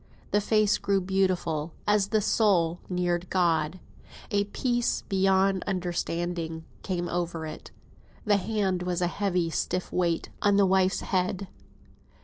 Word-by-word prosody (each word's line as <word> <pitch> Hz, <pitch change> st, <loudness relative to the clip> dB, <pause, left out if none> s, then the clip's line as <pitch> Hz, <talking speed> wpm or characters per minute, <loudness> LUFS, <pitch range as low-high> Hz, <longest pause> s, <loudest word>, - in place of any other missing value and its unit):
The 205 Hz, -, +3 dB
face 215 Hz, 0 st, +2 dB
grew 200 Hz, -1 st, +1 dB
beautiful, 180 Hz, -4 st, 0 dB
as 205 Hz, -1 st, +3 dB
the 215 Hz, +1 st, +1 dB
soul 180 Hz, -6 st, +2 dB
neared 180 Hz, -1 st, -1 dB
God. 170 Hz, -2 st, +1 dB, 0.5 s
A 205 Hz, 0 st, +2 dB
peace 240 Hz, +3 st, -1 dB
beyond 195 Hz, -1 st, +2 dB
understanding 175 Hz, -3 st, -2 dB, 0.2 s
came 175 Hz, -2 st, -2 dB
over 170 Hz, -2 st, -2 dB
it. 155 Hz, 0 st, -8 dB, 0.6 s
The 205 Hz, -1 st, +4 dB
hand 195 Hz, -3 st, -1 dB
was 180 Hz, 0 st, -2 dB
a -, -, +3 dB
heavy, 180 Hz, -3 st, -1 dB
stiff 180 Hz, +3 st, -2 dB
weight 170 Hz, -2 st, 0 dB
on 205 Hz, -1 st, +4 dB
the 200 Hz, -, +5 dB
wife's 190 Hz, 0 st, +2 dB
head. 185 Hz, 0 st, -1 dB
185 Hz, 130 wpm, -27 LUFS, 175-200 Hz, 0.6 s, the